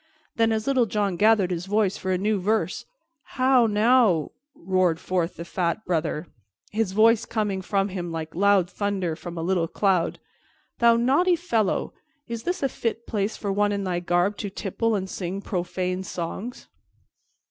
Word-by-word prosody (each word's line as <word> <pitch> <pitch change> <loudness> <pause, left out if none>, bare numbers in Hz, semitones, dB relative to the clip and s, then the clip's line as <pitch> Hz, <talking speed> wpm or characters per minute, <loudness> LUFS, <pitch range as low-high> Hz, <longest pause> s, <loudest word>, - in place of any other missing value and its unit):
Then, 225 0 +2
as 220 0 -1
Little 260 -4 +2
John 200 -2 0
gathered 205 -1 +3
his 175 +1 -3
breath 205 -1 +1
for 190 - -5
a 185 - +2
new 205 +2 0
verse, 215 +4 -1 0.5
"How, 255 -2 +4
now," 215 - +3 0.2
roared 185 -2 +1
forth 180 -2 -1
the 170 - -7
fat 175 +4 -2
Brother, 160 -2 -1 0.5
his 215 -2 0
voice 225 +2 +5
coming 205 -4 -2
from 195 +1 0
him 180 -3 -5
like 160 -1 -5
loud 200 -1 +3
thunder 190 -4 -2
from 175 +1 -8
a 165 - -3
little 175 -1 +1
cloud, 185 -2 +1 0.6
"thou 235 0 +6
naughty 280 +10 +3
fellow, 235 - -1 0.3
is 230 -1 -4
this 355 +3 -3
a - - +4
fit 230 -1 -3
place 205 0 -2
for 200 - -3
one 205 +1 +2
in 200 -1 -2
thy 180 -2 -1
garb 175 +3 +1
to 205 - -4
tipple 215 +4 -1
and 190 -2 -2
sing 185 0 -4
profane 185 -1 -2
songs?" 190 +6 -6
200 Hz, 170 wpm, -25 LUFS, 180-225 Hz, 0.6 s, thou